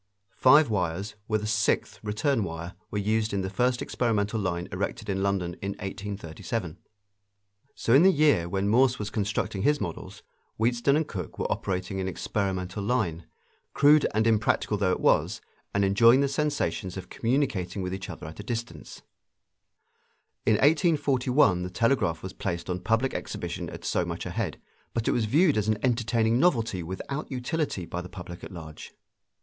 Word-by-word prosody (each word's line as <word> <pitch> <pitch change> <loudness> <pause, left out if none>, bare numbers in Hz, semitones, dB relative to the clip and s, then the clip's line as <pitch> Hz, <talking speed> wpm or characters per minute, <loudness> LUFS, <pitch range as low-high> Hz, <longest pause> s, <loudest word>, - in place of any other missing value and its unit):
Five 145 +3 +6
wires, 95 +1 -1
with 110 -1 0
a - - -2
sixth 105 -1 0
return 110 +4 0
wire, 85 0 -6 0.2
were 105 - -3
used 110 +2 0
in 100 - 0
the 95 0 -4
first 125 +4 +1
experimental 110 -2 0
line 90 -3 -2
erected 100 +3 -3
in 95 0 -1
London 95 -3 0
in 100 0 -2
1837. 100 -1 -5 1.0
So 115 - +1
in 135 - +8
the 190 +2 +7
year 145 - +3
when 95 +2 -1
Morse 125 +3 +4
was 105 0 -4
constructing 105 -1 -1
his 145 +4 +3
models 85 -5 -6 0.3
Wheatstone 120 +4 +2
and 155 0 +1
Cooke 95 -9 -6
were - - -2
operating 95 0 -2
an 95 - -2
experimental 95 0 -2
line, 100 -8 -1 0.5
crude 145 +1 +6
and 110 +1 +2
impracticable 110 -2 +2
though 95 -2 +2
it - - 0
was, - - +2 0.3
and 100 0 +2
enjoying 115 +7 +6
the 140 - +2
sensations 140 -9 -1
of 95 -1 -7
communicating 115 -7 -1
with 90 0 -3
each 95 0 -5
other - - -8
at 80 +4 -9
a - - -5
distance. 120 +1 -6 1.4
In - - +6
1841 140 - +3
the 90 - -3
telegraph 90 -5 +1
was 95 - -6
placed 85 -1 -3
on 90 - -2
public 115 +7 +1
exhibition - - -4
at - - -9
so - - +1
much - - -5
a - - -4
head, - - -3 0.4
but 115 -1 -1
it - - +4
was 115 - +1
viewed 150 - +3
as 105 - -2
an 110 -1 +2
entertaining 115 -1 +2
novelty 115 - +2
without 95 - -5
utility 130 - -2
by 90 +1 -4
the 90 - -9
public 90 -2 -9
at - - -8
large. 80 -4 -10
105 Hz, 170 wpm, -27 LUFS, 95-125 Hz, 1.4 s, in